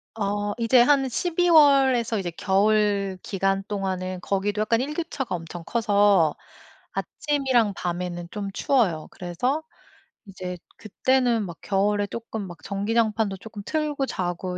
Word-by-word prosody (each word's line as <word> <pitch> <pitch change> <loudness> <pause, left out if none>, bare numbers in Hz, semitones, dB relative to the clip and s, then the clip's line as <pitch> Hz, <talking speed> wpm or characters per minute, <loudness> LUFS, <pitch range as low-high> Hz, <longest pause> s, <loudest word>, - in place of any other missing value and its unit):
어 205 -1 -1
이제 240 +1 +5
한 270 +1 +4
12 350 +6 0
월에서 270 -7 +5
이제 175 -3 -3
겨울 200 0 +1
기간 195 0 -1
동안은 185 -2 -3
거기도 205 +3 -1
약간 230 +2 +2
일교차가 295 - -3
엄청 170 0 -8
커서 205 -6 +3 0.6
아침이랑 260 -8 0
밤에는 175 0 -4
좀 200 -2 -4
추워요. 195 - +1
그래서 245 - -2 0.6
이제 185 -2 -7 0.2
그때는 240 +1 +1
막 170 -3 -8
겨울에 205 +1 +1
조금 220 -1 -6
막 175 -1 -10
전기장판도 215 0 0
조금 210 +1 -9
틀고 300 -3 -1
자고 180 -1 -3
205 Hz, 270 characters per minute, -25 LUFS, 190-245 Hz, 0.6 s, 이제